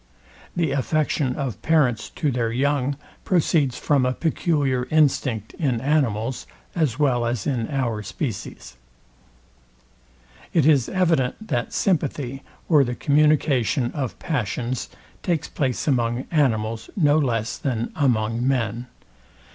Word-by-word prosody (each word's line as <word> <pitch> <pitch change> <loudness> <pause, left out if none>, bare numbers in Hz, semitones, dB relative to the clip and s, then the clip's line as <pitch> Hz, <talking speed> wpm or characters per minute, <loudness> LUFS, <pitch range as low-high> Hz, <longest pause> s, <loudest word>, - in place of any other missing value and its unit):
The 165 -4 +1
affection 140 -1 0
of 135 -6 -4
parents 135 -9 +2
to 150 - -1
their 120 -2 -1
young 140 +2 0 0.3
proceeds 155 -7 +2
from 140 -3 +2
a 125 0 +1
peculiar 145 -5 0
instinct 135 -8 +1
in 130 -8 +1
animals, 130 -4 0 0.3
as 150 -8 +1
well 130 -5 +2
as 120 -2 -2
in 120 -6 -1
our 120 -6 -1
species. 100 - -6 1.8
It 160 -5 +3
is 140 -6 +4
evident, 170 0 0
that - - -1
sympathy, 140 - -1 0.3
or 150 -4 +5
the 125 -1 -3
communication 140 - +2
of 135 -5 -4
passions, 125 - -2 0.3
takes 170 -5 -1
place 130 -1 -2
among 120 -2 +1
animals, 115 -7 0
no 150 -3 +4
less 115 -5 -1
than 120 -4 -2
among 120 -3 +1
men. 120 -2 -1
130 Hz, 120 wpm, -23 LUFS, 120-150 Hz, 1.8 s, or